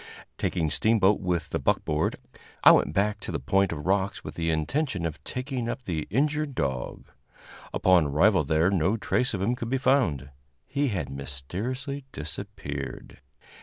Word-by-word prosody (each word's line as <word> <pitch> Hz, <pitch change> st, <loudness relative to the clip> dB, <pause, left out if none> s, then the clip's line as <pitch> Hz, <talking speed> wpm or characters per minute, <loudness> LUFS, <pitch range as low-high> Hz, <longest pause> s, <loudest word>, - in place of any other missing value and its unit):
Taking 80 Hz, -4 st, 0 dB
Steamboat 105 Hz, +2 st, +3 dB
with 85 Hz, -4 st, -2 dB
the -, -, 0 dB
buckboard, 75 Hz, 0 st, +1 dB, 0.5 s
I -, -, +10 dB
went -, -, +4 dB
back 105 Hz, +5 st, +1 dB
to -, -, -6 dB
the -, -, -2 dB
point 95 Hz, -1 st, +2 dB
of 75 Hz, -2 st, -5 dB
rocks 95 Hz, +1 st, 0 dB
with -, -, -7 dB
the 80 Hz, -1 st, -1 dB
intention 90 Hz, -, 0 dB
of 80 Hz, -2 st, -5 dB
taking 125 Hz, -2 st, -3 dB
up 130 Hz, -, -4 dB
the 80 Hz, -4 st, -3 dB
injured 150 Hz, +2 st, 0 dB
dog. 65 Hz, -, -3 dB, 0.7 s
Upon 90 Hz, -5 st, +4 dB
arrival 90 Hz, +6 st, +4 dB
there 80 Hz, +5 st, +2 dB
no 95 Hz, +3 st, +2 dB
trace 125 Hz, +2 st, 0 dB
of 95 Hz, -, -2 dB
him 115 Hz, +5 st, +2 dB
could 115 Hz, -2 st, -5 dB
be 135 Hz, -, +1 dB
found; 95 Hz, -, +1 dB, 0.3 s
he 140 Hz, +2 st, 0 dB
had 90 Hz, -, -2 dB
mysteriously 100 Hz, -, -5 dB
disappeared. 75 Hz, -4 st, -6 dB
95 Hz, 160 wpm, -27 LUFS, 80-125 Hz, 0.7 s, I